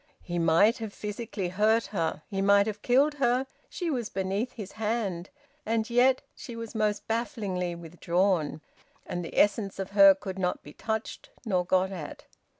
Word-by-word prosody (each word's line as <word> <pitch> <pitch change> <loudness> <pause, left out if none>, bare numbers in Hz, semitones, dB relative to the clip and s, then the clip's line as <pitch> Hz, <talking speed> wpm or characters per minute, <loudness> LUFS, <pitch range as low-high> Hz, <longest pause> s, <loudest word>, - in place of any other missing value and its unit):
He 175 -1 -3
might 165 +8 +4
have 220 -2 -5
physically 210 -3 -4
hurt 215 +5 +2
her, 165 -4 -1
he 195 -1 -2
might 200 0 +5
have 210 -1 -4
killed 275 +5 +3
her, 250 +1 +3 0.2
she 345 -3 -3
was 240 -6 -2
beneath 195 +6 -2
his 205 -4 -7
hand 210 -5 -2 0.3
and 225 -4 0
yet 255 +2 +4
she 240 - -8
was 230 -1 -7
most 215 -2 -1
bafflingly 205 -7 -2
withdrawn, 170 -1 0 0.4
and 175 0 -4
the 165 - -8
essence 205 -1 +2
of 195 0 -5
her 195 -1 +8
could 190 0 -6
not 180 -1 -1
be 145 - -12
touched 220 0 -4 0.2
nor 185 -5 +1
got 185 +1 +1
at. 165 -6 -7
200 Hz, 165 wpm, -28 LUFS, 185-225 Hz, 0.4 s, her